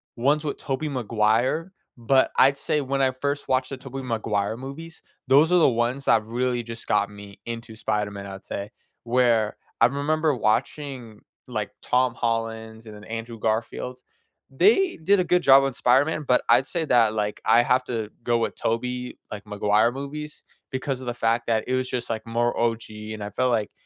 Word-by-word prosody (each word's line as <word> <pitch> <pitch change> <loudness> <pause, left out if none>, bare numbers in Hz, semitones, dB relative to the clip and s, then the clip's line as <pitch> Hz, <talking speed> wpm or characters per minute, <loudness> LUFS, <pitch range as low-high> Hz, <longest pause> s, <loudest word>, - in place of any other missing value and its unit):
ones 145 +6 +2
with 150 - -3
Tobey 145 +3 -3
Maguire, 120 - +1 0.3
but 130 +3 +3
I'd 140 +1 +5
say 150 - 0
when 135 0 -1
I 130 -1 +3
first 140 +2 -3
watched 130 0 +1
the 135 - -5
Tobey 135 +1 -7
Maguire 110 -3 -2
movies, 155 +6 -9 0.2
those 145 +6 +5
are 180 - +5
the 160 - +5
ones 120 +3 -1
that 110 -2 +3
really 120 +1 -1
just 115 0 -9
got 100 - +2
me 100 -1 -12
into 115 -1 -6
Spider-Man, 105 -2 -2
I'd 95 -1 -9
say, 100 +1 -5 0.3
where, 115 -3 +2 0.2
I - - +7
remember 150 +3 0
watching, 120 +1 -2 0.3
like, - - -3
Tom 125 -1 +1
Holland's 115 -1 -3
and 105 - -9
then 105 - -12
Andrew 115 +1 -6
Garfield's. 115 +3 -2 0.5
They 220 - +3
did 195 +5 +3
a - - +3
good 180 0 +2
job 135 0 +7
on 135 -1 -1
Spider-Man, 140 +6 +2
but 125 - +4
I'd 135 - +5
say 165 +4 -2
that, 115 -6 +4
like, 105 -1 -2
I 115 +2 +5
have 125 +1 +2
to 110 -4 -4
go 120 0 +2
with 115 - -2
Tobey, 125 +2 -3
like, 105 0 -8
Maguire 105 +2 +2
movies 145 +3 -7 0.3
because 130 0 -3
of 130 - -8
the 120 - -1
fact 115 0 0
that 110 -2 +1
it 130 - -1
was 130 0 0
just, 125 -1 -3
like, 110 -1 -3
more 120 +1 0
OG, 115 -1 0
and 105 0 -7
I 105 - -4
felt 130 +5 +1
like, 110 -3 0
120 Hz, 190 wpm, -24 LUFS, 110-135 Hz, 0.5 s, I